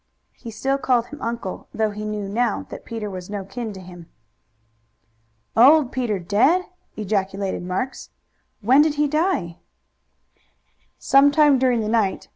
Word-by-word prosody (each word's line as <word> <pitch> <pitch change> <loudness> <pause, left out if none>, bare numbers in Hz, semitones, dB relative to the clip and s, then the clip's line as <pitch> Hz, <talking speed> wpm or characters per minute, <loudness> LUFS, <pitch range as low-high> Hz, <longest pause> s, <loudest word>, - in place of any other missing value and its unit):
He 235 - -10
still 270 +5 -1
called 250 -3 +1
him 295 - -10
uncle, 230 -5 -5
though 220 -1 0
he 210 +1 -6
knew 210 -1 -4
now 225 +2 -1
that - - -9
Peter 225 -2 -5
was 185 -2 -7
no 200 -2 -5
kin 220 +3 -6
to 190 - -10
him. 175 -2 -12 1.5
"Old 270 +3 +6
Peter 240 -6 -1
dead!" 220 - +2 0.3
ejaculated 195 -2 -2
Marks. 185 +9 -4 0.5
"When 255 +7 +5
did 300 -1 +2
he 295 0 +2
die?" 305 - -1 1.4
"Some 275 +1 +5
time 290 -2 +4
during 250 -3 +2
the 215 - -3
night. 215 -3 0
225 Hz, 145 wpm, -22 LUFS, 200-270 Hz, 1.5 s, Old